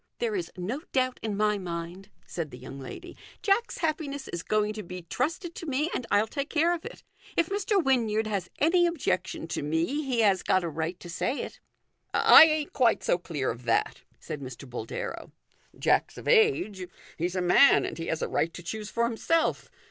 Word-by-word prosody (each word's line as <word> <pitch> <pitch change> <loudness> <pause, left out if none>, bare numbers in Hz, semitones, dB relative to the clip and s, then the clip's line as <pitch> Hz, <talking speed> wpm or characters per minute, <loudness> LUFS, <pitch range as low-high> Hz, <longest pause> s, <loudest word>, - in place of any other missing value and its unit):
" - - -55
There 465 -3 -1
is 360 -3 -3
no 215 +11 -3
doubt 255 -1 +1
in 210 -3 -3
my 210 -1 +2
mind/' 175 +2 -6 0.2
said 165 -3 -4
the 125 - -10
young 130 +2 -9
lady. 130 - -9
" - - -24
Jack's 425 +3 +1
happiness 300 -4 -2
is 170 - -4
going 215 +2 0
to 215 - -5
be 180 -1 -8
trusted 320 - -2
to 335 - -8
me, 295 +5 0
and 240 - -3
I'll 205 +1 +3
take 280 +5 -4
care 330 +3 +2
of 340 - -5
it. - - -9 0.3
If 335 -1 +2
Mr. 405 +1 0
Wynyard 225 -5 +2
has 200 -4 -2
any 345 +3 +4
objection 190 - -2
to - - -2
me 160 - 0
he 255 -4 0
has 195 -4 +3
got 185 - +2
a 170 - -2
right 160 +3 -3
to - - -9
say 240 +10 -2
it." - - -8 0.4
" - - -50
I - - +9
ain't 310 -2 -1
quite 240 -4 +3
so 175 - +2
clear 150 -6 -2
of 120 +1 -9
that," 115 -1 +1 0.2
said 150 -2 -6
Mr. 130 +1 -8
Boldero. 120 -2 -6 0.4
"Jack's - - +1
of - - -9
age; 415 - +3 0.3
he's 175 +3 -1
a - - +1
man, 180 +10 +6
and - - -5
he 165 - -4
has 160 - -1
a - - 0
right 165 - 0
to 175 - -8
choose 210 +4 -5
for 235 - 0
himself. 240 +8 0
215 Hz, 210 wpm, -28 LUFS, -, 0.4 s, I